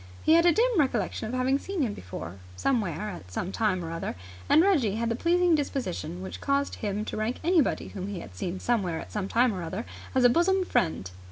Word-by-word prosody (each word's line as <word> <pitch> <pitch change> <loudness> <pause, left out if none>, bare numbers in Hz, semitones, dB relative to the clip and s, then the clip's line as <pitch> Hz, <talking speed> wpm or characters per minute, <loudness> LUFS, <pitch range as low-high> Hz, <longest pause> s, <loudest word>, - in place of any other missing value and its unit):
He 315 - +5
had 335 +1 +6
a - - +7
dim 460 +1 +2
recollection 235 -6 0
of 240 - -3
having 260 +2 +2
seen 380 -3 -2
him 220 -5 -1
before 90 - -8 0.2
somewhere 210 - 0
at 90 - -10
some 180 - -3
time 190 -5 0
or 165 - -5
other, 165 0 -4 0.3
and 315 - +6
Reggie 280 - +3
had 230 +1 -1
the 230 - 0
pleasing 350 +5 +3
disposition 190 - -2
which 190 - -7
caused 280 0 0
him 210 -1 -2
to - - -5
rank 220 +3 -2
anybody 335 -4 +2
whom 190 -1 -6
he 200 -3 -4
had 90 - -10
seen 175 - -4
somewhere 190 -9 0
at - - -9
some 205 -3 -2
time 235 +2 +3
or 185 - -4
other 185 +7 -4 0.3
as 260 - +4
a - - +9
bosom 370 +7 +3
friend. 160 - 0
225 Hz, 225 wpm, -27 LUFS, 185-290 Hz, 0.3 s, a